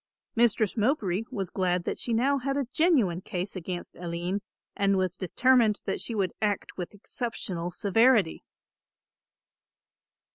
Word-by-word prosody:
Mistress 225 -3 +3
Mowbray 215 - +1
was 195 -8 -4
glad 180 -2 0
that - - -3
she - - -3
had 230 - +2
now 275 +4 +2
a 275 +1 -1
genuine 255 - +3
case 185 +2 -4
against 180 0 -5
Aline 175 +3 -3 0.3
and 200 -1 +2
was 185 -1 0
determined 225 +3 +3
that 195 - -2
she 230 - -3
would 190 -4 0
act 205 -2 -1
with 180 +2 -6
exceptional 195 -6 -4
severity. 210 0 +3
200 Hz, 135 wpm, -28 LUFS, 180-240 Hz, 0.3 s, Mistress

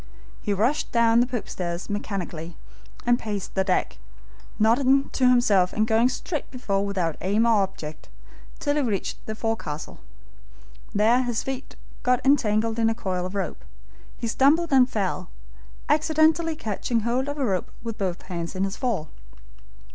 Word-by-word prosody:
He 210 - -2
rushed 225 +9 +1
down 235 -1 +4
the 245 - +3
poop 245 -4 -4
stairs 175 -1 -4
mechanically 180 -5 -4 0.5
and 240 0 +3
paced 205 -3 -4
the 190 - +1
deck, 190 -1 0 0.6
nodding 260 +5 +3
to 255 -1 +3
himself 210 -7 +4
and 215 - +2
going 225 +2 +3
straight 295 +4 -4
before 200 -6 -1
without 185 -6 -1
aim 205 +5 +2
or 225 -3 +4
object 155 -5 -5 0.5
till 290 0 0
he - - +3
reached 215 -7 -2
the 220 - -3
forecastle. 220 -10 -4 0.9
There 225 +5 +4
his 240 -3 -1
feet 270 0 -6 0.3
got 250 -1 +3
entangled 225 -4 +2
in 225 0 +3
a 225 - 0
coil 185 -5 -2
of 185 - -9
rope. 195 - -3 0.5
He - - -4
stumbled 290 +8 +3
and 255 -1 +6
fell, 200 -6 -2 0.6
accidentally 315 +1 +3
catching 230 -2 -2
hold 245 +4 0
of 290 - -4
a 275 - 0
rope 190 -5 -1
with 230 -2 -5
both 185 -3 -2
hands 170 -1 -5
in 185 - 0
his 195 +1 -2
fall. 225 - -2
225 Hz, 160 wpm, -25 LUFS, 195-255 Hz, 0.9 s, and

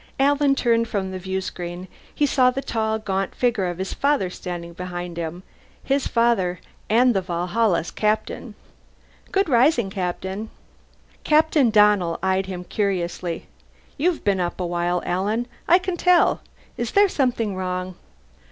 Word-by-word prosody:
Alan 285 0 +3
turned 230 -3 +2
from 195 -3 -2
the 185 - -5
viewscreen. 185 -1 -5 0.3
He 295 - +2
saw 255 -3 +4
the 270 +2 -3
tall, 220 -1 -1
gaunt 195 -3 -2
figure 235 -7 +1
of 175 -1 -4
his 190 +1 -3
father 280 -10 +1
standing 175 -2 -6
behind 175 -1 -6
him. 170 +2 -5 0.4
His 275 0 0
father 220 -7 +1 0.3
and 245 +3 +4
the 195 - +1
Valhalla's 180 +1 0
captain. 215 0 -2 0.8
"Good 390 -1 +2
rising, 245 -5 +3
Captain." 190 +3 -4 0.7
Captain 305 -4 +4
Donnell 210 -6 +4
eyed 190 0 +1
him 180 -2 -5
curiously. 180 -3 -2 0.5
"You've 335 +3 0
been 200 -2 +1
up 175 0 -2
a 180 - -1
while, 175 0 -1
Alan. 205 +6 0 0.2
I 350 - +7
can 370 -1 -3
tell. 360 0 +4 0.4
Is 240 -1 -3
there 405 0 +6
something 240 - 0
wrong?" 185 0 -3
195 Hz, 145 wpm, -23 LUFS, 180-245 Hz, 0.8 s, I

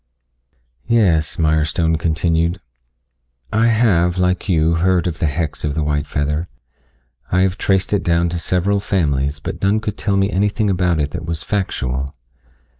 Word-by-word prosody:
"Yes," 95 -10 +2
Mirestone 80 +1 +1
continued. 85 +2 0 0.9
"I 110 +2 +3
have, 95 -7 +2
like 90 +1 0
you, 80 -2 +3
heard 90 +1 +2
of 85 -2 -3
the 80 - +1
hex 75 0 -3
of 75 -1 -1
the 80 - 0
white 75 -1 -1
feather. 75 +3 -1 0.8
I 95 - +3
have 95 -1 +1
traced 95 -2 0
it 100 - +2
down 85 0 +1
to 85 0 -3
several 95 +4 0
families, 75 -8 0
but - - -6
none 100 +2 +2
could 105 -1 -5
tell 100 -2 0
me 100 +1 +1
anything 105 +2 +1
about 90 -3 +1
it 75 -1 -1
that 80 - -6
was 80 -1 -3
factual. 70 -10 -2
85 Hz, 160 wpm, -19 LUFS, 80-95 Hz, 0.9 s, I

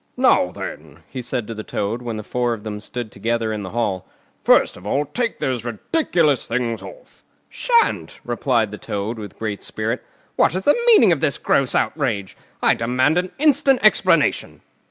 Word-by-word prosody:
"Now - - +4
then!" 75 +1 -9
he 130 - -6
said 120 -1 -3
to 115 - -6
the 110 -1 -7
Toad, 105 +4 -3
when 120 -2 -4
the 110 - -6
four 120 +1 -1
of 105 - -13
them 105 -1 -5
stood 115 +1 -6
together 115 +1 -1
in 105 - -4
the 95 - -6
Hall, 95 -5 -2 0.4
"first - - +4
of 90 - -10
all, 145 +6 +1
take 230 - -2
those 125 -4 -2
ridiculous 150 - 0
things 115 -1 -2
off!" - - -13 0.3
"Shan't!" 470 -2 +1
replied 120 -3 0
Toad, 105 +3 -4
with 105 -3 -9
great 105 -2 -4
spirit. - - -3 0.3
"What 155 - +3
is 190 - -2
the 290 - +5
meaning 335 - +7
of 160 - +2
this 145 -2 +1
gross 135 -2 +1
outrage? 110 -11 -1 0.3
I - - +5
demand 130 +8 +1
an 180 0 -4
instant 280 -2 +3
explanation." 215 - +3
120 Hz, 175 wpm, -21 LUFS, 110-155 Hz, 0.4 s, meaning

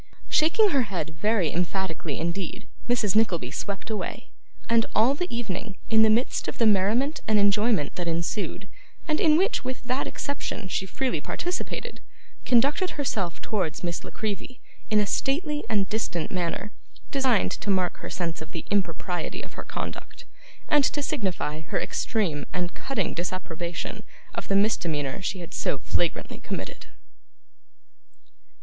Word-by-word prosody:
Shaking 390 +7 +5
her 275 - +4
head 160 -4 -3
very 210 -7 +3
emphatically 175 -3 -1
indeed, 170 +2 -3 0.2
Mrs. 215 -5 +2
Nickleby 175 - +2
swept 200 +2 -4
away; 215 - -4 0.4
and 230 -1 +4
all 230 +5 +5
the 355 +5 -2
evening, 220 -4 -3
in 220 0 +7
the 220 - +7
midst 230 +4 +2
of - - -3
the 230 - +3
merriment 220 +8 +3
and 215 -1 +4
enjoyment 205 - +3
that 175 -1 -2
ensued, 170 +4 -1 0.4
and 310 -1 +2
in 310 -1 +6
which 390 - +2
with 255 0 -4
that 255 +2 0
exception 285 -8 -3
she 190 +1 -1
freely 265 +5 -1
participated, 355 +1 -3 0.5
conducted 280 +10 +3
herself 210 - -1
towards 185 -8 -1
Miss 170 -1 -2
La - - -7
Creevy 220 +4 -4 0.3
in 215 -2 +5
a 210 - +3
stately 295 - 0
and 205 -3 +2
distant 205 -7 -1
manner, 180 +3 -1 0.4
designed 265 -6 +3
to 205 - -3
mark 185 -2 +2
her - - -7
sense 170 -3 -2
of 160 - -9
the 165 - -4
impropriety 180 -3 -1
of - - -9
her - - -6
conduct, - - -6 0.4
and 295 -1 +5
to 290 +2 +1
signify 180 - -1
her 155 - -2
extreme 175 -11 0
and 180 0 -1
cutting 230 -9 -1
disapprobation 175 -1 -3 0.3
of - - -4
the 195 - +2
misdemeanour 170 -7 +1
she 185 0 -2
had 170 - -8
so - - 0
flagrantly 170 +5 -1
committed. - - -5
205 Hz, 150 wpm, -27 LUFS, 175-245 Hz, 0.5 s, in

